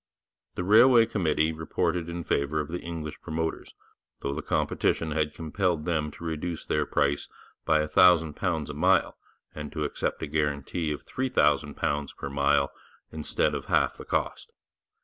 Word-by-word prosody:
The 90 - -2
railway 115 +4 +7
committee 80 -7 +1
reported 85 +2 -1
in 85 0 -4
favour 70 +1 0
of 75 - -3
the 90 +1 -3
English 80 -3 -6
promoters, 80 0 -4 0.5
though 70 - -2
the 75 - -4
competition 80 +1 0
had 75 0 -1
compelled 85 0 -1
them 80 -3 0
to - - -12
reduce 80 +1 -4
their - - 0
price 70 0 0 0.4
by 80 -1 +3
a 75 - -2
thousand 85 -2 +5
pounds 80 -5 -2
a - - -8
mile, - - +2 0.4
and 75 -1 -7
to 75 - -2
accept 75 - -2
a - - 0
guarantee 75 +2 -1
of 75 - -5
£3000 75 - 0
per 70 - -5
mile 70 0 +2 0.4
instead 80 -1 0
of - - -4
half - - +2
the - - -8
cost. - - -2
80 Hz, 160 wpm, -27 LUFS, 75-85 Hz, 0.5 s, railway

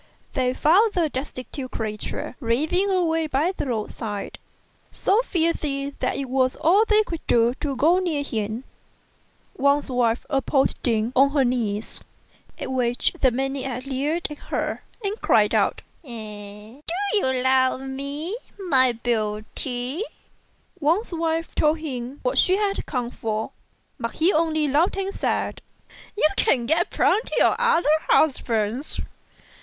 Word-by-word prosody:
They 255 -1 0
found 405 +8 +4
the 335 -3 +1
destitute 260 -1 -6
creature 215 +1 -4
raving 310 +11 +1
away 325 -4 +1
by 300 +5 +1
the 290 - -3
road 220 -4 -2
side, 205 -3 -5 0.5
so 420 +4 +2
filthy 310 - -1
that - - -1
it 275 - -2
was 255 0 +1
all 360 +8 +4
they 430 0 +5
could 335 -6 -5
do 235 0 +4
to 280 -2 -2
go 330 +8 +4
near 325 -6 -1
him. 220 -2 -3 0.9
Wang's 280 0 +2
wife 240 -2 +1
approached 275 -1 +1
him 225 +1 +1
on 275 +2 +6
her 275 -3 +3
knees; 225 -4 -2 0.6
at - - -5
which 245 -2 +1
the 260 - +6
maniac 265 0 -3
leered 285 +5 -1
at 295 - -8
her, - - -3 0.2
and 405 +3 -2
cried - - +3
out, - - +1 0.2
"Do 285 - -14 1.0
you 415 - +3
love 260 0 +2
me, 280 +7 -3 0.2
my 265 -10 +4
beauty?" 240 - -2 0.8
Wang's 345 +7 +1
wife 330 0 -1
told 305 +1 +2
him 265 -3 -6
what - - +1
she 370 +1 +4
had 405 -1 -1
come 245 -4 -2
for, 220 -2 -3 0.5
but 230 - -3
he 340 +5 +2
only 315 -1 +2
laughed 310 +8 +2
and 390 0 -2
said, - - -1 0.6
"You 305 - +5
can 255 - +3
get 325 +7 +2
plenty 445 - +1
of - - +4
other 470 -10 +3 0.2
husbands. 240 -3 +1
275 Hz, 140 wpm, -24 LUFS, 245-330 Hz, 1.0 s, on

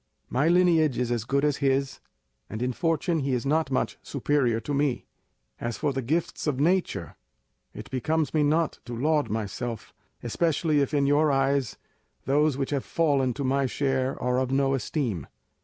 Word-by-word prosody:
My 140 +5 +2
lineage 165 -6 +4
is 125 -1 -1
as 115 -2 -1
good 140 +3 +1
as 145 -2 +1
his, 135 0 0 0.5
and 110 +4 -4
in 125 0 -1
fortune 165 +5 0
he 135 -2 -1
is 125 - -3
not 155 +1 +1
much 130 - -1
superior 135 -4 0
to 145 - -4
me. 140 -2 0 0.5
As 120 -2 -3
for 145 -2 -1
the 135 - -2
gifts 155 +6 -2
of 140 -3 0
nature, 165 - 0 0.6
it - - -8
becomes 155 +3 0
me 155 - +2
not 155 +3 +1
to 120 -2 -6
laud 150 +3 +1
myself, 110 +2 -4 0.3
especially 155 +4 +1
if 140 - 0
in 140 -1 +3
your 145 +2 +3
eyes 135 -3 +1 0.5
those 145 +1 +2
which 135 0 -2
have 140 -2 -1
fallen 140 -6 +1
to 140 - -3
my 135 +1 +1
share 135 0 -1
are 125 0 +1
of 130 -1 -1
no 135 0 +2
esteem. 125 - -2
140 Hz, 175 wpm, -26 LUFS, 125-150 Hz, 0.6 s, lineage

